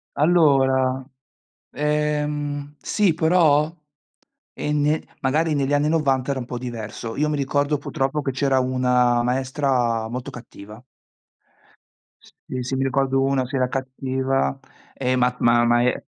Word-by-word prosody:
Allora, 135 -5 +3 0.7
ehm, 150 -1 -2
sì 200 -6 +1
però, 160 -2 +3 0.8
e 150 - -3
ne 150 +1 +1 0.2
magari 155 +4 +1
negli 140 -1 0
anni 145 +1 +2
90 140 -4 +1
era 135 - -2
un - - -6
po' 125 - -5
diverso. 115 -2 -6
Io 150 +1 0
mi 150 - -1
ricordo 145 +2 0
purtroppo 140 +1 -2
che 140 - -2
c'era 135 0 +1
una 125 -1 +2
maestra 125 -3 0
molto 125 +1 -5
cattiva. 110 -2 -12 1.4
Sì, 130 - -8
sì, 125 +2 -3
mi 135 - 0
ricordo 135 0 +1
una 135 -1 +1
che 135 +3 -6
era 130 -1 +1
cattiva, 130 - -2 0.3
e 130 -1 -1
ma 125 0 +1
ma 120 0 +4
ma 120 0 +3
e 125 +1 0
135 Hz, 135 wpm, -22 LUFS, 125-150 Hz, 1.4 s, ma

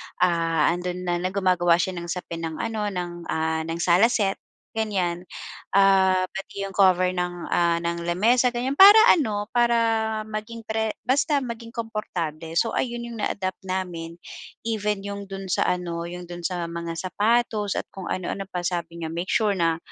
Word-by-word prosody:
Ah, 170 -2 +2
'andon 180 +1 -3
na, 175 -1 0
na 180 - -1
gumagawa 185 -3 +3
siya 175 +2 0
ng 170 - -7
sapin 170 -1 -5
ng 160 - -6
ano, 215 +2 -2
ng, 180 -3 -3 0.2
ah, 160 0 0
ng 165 0 -3
sala 180 +6 +5
set, 200 -5 0 0.3
ganyan. 190 -6 -1 0.5
Ah, 190 -1 +5
pati 195 0 -6
'yong 195 - -7
cover 185 -2 +4
ng, 180 -1 -3
ah, 170 -1 +3
ng 170 0 -2
lamesa, 230 +8 +3
ganyan. 245 +3 -2
Para 400 +7 +9 0.2
ano, 215 - 0
para, 240 -1 +3 0.5
maging 220 +1 -6
pre 220 0 -2
basta 285 +3 +2
maging 230 -2 -6
komportable. 170 -8 -4
So, 230 - +2
ayun 240 -1 -2
'yong 235 -1 -7
na-adapt 185 -1 -2
namin. 175 -3 -4 0.5
Even 210 -3 -1
'yong 200 -1 -6
do'n 195 0 -6
sa - - +2
ano, 170 -1 -2
'yong 180 0 -7
do'n 175 0 -8
sa 175 0 -2
mga 170 0 -5
sapatos, 210 +2 0
at - - -2
kung 190 -2 -7
ano-ano 190 +1 -3
pa. 180 -2 -4
Sabi 170 -1 -3
niya, 160 - -4
"Make 175 +2 -4
sure 215 -3 +2
na, 165 -3 +1
185 Hz, 170 wpm, -24 LUFS, 175-215 Hz, 0.5 s, Para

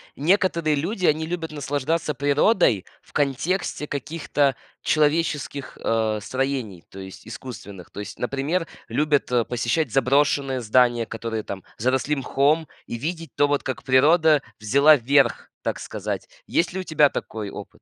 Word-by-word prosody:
некоторые 170 -1 +2
люди, 180 +6 -1
они 155 +1 +2
любят 165 -1 -4
наслаждаться 150 +2 -1
природой 145 - +2 0.2
в - - -24
контексте 150 +3 -1
каких-то 145 -2 -1 0.3
человеческих, 150 -3 0
а, 110 -1 0
строений, 130 -8 -3
то 95 - -10
есть 95 0 -10
искусственных, 100 -7 -9
то 100 - -9
есть, 105 -1 -7
например, 140 +7 -1 0.2
любят 150 -3 +1 0.2
посещать 120 +6 0
заброшенные 135 0 +2
здания, 120 0 +3
которые 110 0 -4
там 100 -2 -7 0.2
заросли 130 +5 +1
мхом, 145 +4 +1 0.2
и 120 - -5
видеть 165 +5 -4
то, 145 - +4
вот 145 0 0
как 130 -2 -4
природа 150 +3 +4 0.2
взяла 140 +8 +5
верх, 140 +3 +2
так - - -2
сказать. - - -5 0.2
Есть 170 +1 0
ли 190 - -3
у - - -3
тебя 155 -4 +4
такой 110 -6 -5
опыт? - - -10
140 Hz, 140 wpm, -23 LUFS, 125-155 Hz, 0.3 s, взяла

